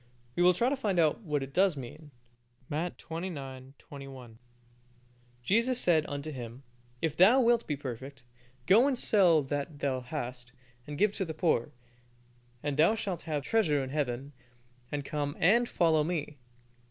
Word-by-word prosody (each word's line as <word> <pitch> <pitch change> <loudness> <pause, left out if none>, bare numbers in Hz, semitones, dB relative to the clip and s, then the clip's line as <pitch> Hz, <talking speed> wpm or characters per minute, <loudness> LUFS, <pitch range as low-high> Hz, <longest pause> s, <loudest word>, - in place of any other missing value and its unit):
We - - 0
will 180 0 +6
try 235 - +2
to 280 - 0
find 210 -9 -1
out 160 +4 +3
what 150 -8 -2
it 135 0 -9
does 190 -4 +3
mean 145 +4 -9 0.6
(Matt. 165 +4 -2
xix. 140 -6 -7
21) 135 -5 -11 1.0
"Jesus 235 - +2
said 160 -7 +3
unto 145 +2 -5
him, 125 -1 -8 0.4
If 160 -2 0
thou 200 +10 +6
wilt 235 -2 +3
be 150 - -1
perfect, 135 0 -7 0.4
go 225 - +6
and 270 -3 0
sell 180 -10 +4
that 145 +2 -4
thou 135 -2 -1
hast, 125 -2 -6 0.3
and 145 0 -6
give 210 +3 +3
to 195 - -2
the 160 -2 -6
poor, 155 -9 +1 0.9
and 145 -1 -2
thou 165 +8 +5
shalt 195 -5 -3
have 150 -2 -1
treasure 150 -9 +2
in 130 - -6
Heaven: 140 -1 -2 0.6
and 145 -1 -3
come 145 -1 -3
and 235 +8 +4
follow 160 -3 +3
Me." 150 -3 -3
150 Hz, 160 wpm, -30 LUFS, 135-180 Hz, 1.0 s, will